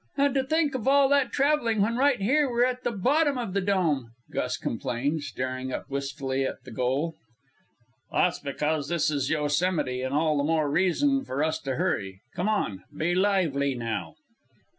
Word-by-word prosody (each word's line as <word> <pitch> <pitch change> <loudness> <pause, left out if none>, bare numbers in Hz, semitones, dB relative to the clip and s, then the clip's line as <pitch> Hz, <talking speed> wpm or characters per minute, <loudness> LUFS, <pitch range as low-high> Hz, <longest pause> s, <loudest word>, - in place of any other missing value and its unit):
"And 280 -1 +3
to 270 -1 +2
think 305 +1 +1
of 255 -3 -3
all 275 0 +5
that 280 -1 +3
traveling, 275 -6 +2
when 225 +3 +1
right 275 0 +3
here 265 +8 +2
we're 240 0 +3
at 250 0 -2
the - - +1
bottom 280 +7 +2
of 230 -7 -3
the 200 - +1
Dome!" 165 - 0 0.2
Gus 125 0 -1
complained, 135 +7 -2
staring 130 -2 -4
up - - -4
wistfully 135 -1 -2
at 130 - -4
the - - -11
goal. 130 +8 -1 1.0
"That's 180 - +2
because 150 +1 -2
this 165 -3 +1
is 140 -3 -1
Yosemite, 150 -3 0
and 130 +2 -2
all 155 -1 +2
the - - +1
more 155 -1 +1
reason 270 - +2
for 135 +3 -2
us 160 0 0
to 135 -4 -3
hurry. 95 -5 -2
Come 180 +4 -1
on! 110 - -1
Be 170 +3 +1
lively, 175 -8 +1
now!" 110 -9 -4
160 Hz, 180 wpm, -27 LUFS, -, 1.0 s, all